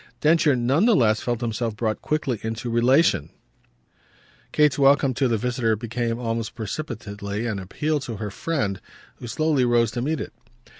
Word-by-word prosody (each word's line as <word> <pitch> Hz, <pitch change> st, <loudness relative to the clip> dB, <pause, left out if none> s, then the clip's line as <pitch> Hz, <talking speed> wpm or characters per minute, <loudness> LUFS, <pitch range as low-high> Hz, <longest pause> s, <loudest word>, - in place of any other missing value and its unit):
Densher 155 Hz, -2 st, +4 dB
none 130 Hz, -, +2 dB
the 230 Hz, -, +5 dB
less 110 Hz, -4 st, +3 dB
felt 120 Hz, -1 st, -2 dB
himself 115 Hz, -1 st, -2 dB
brought 110 Hz, -1 st, -2 dB
quickly 135 Hz, -7 st, -1 dB
into 115 Hz, +2 st, -4 dB
relation; 120 Hz, -, +3 dB, 1.2 s
Kate's 150 Hz, -2 st, +3 dB
welcome 140 Hz, -1 st, +4 dB
to 135 Hz, +1 st, +1 dB
the 115 Hz, -2 st, +1 dB
visitor 120 Hz, -1 st, 0 dB
became 115 Hz, +1 st, -3 dB
almost 115 Hz, -2 st, -3 dB
precipitately 105 Hz, -3 st, -5 dB
an 110 Hz, -4 st, -2 dB
appeal 150 Hz, +11 st, -2 dB
to 125 Hz, -4 st, -6 dB
her 105 Hz, 0 st, -5 dB
friend, 105 Hz, -, -2 dB, 0.4 s
who 120 Hz, -, -8 dB
slowly 155 Hz, +1 st, +1 dB
rose 120 Hz, -2 st, +3 dB
to 120 Hz, -, -3 dB
meet 155 Hz, +4 st, -1 dB
it. -, -, -6 dB
120 Hz, 160 wpm, -24 LUFS, 110-140 Hz, 1.2 s, the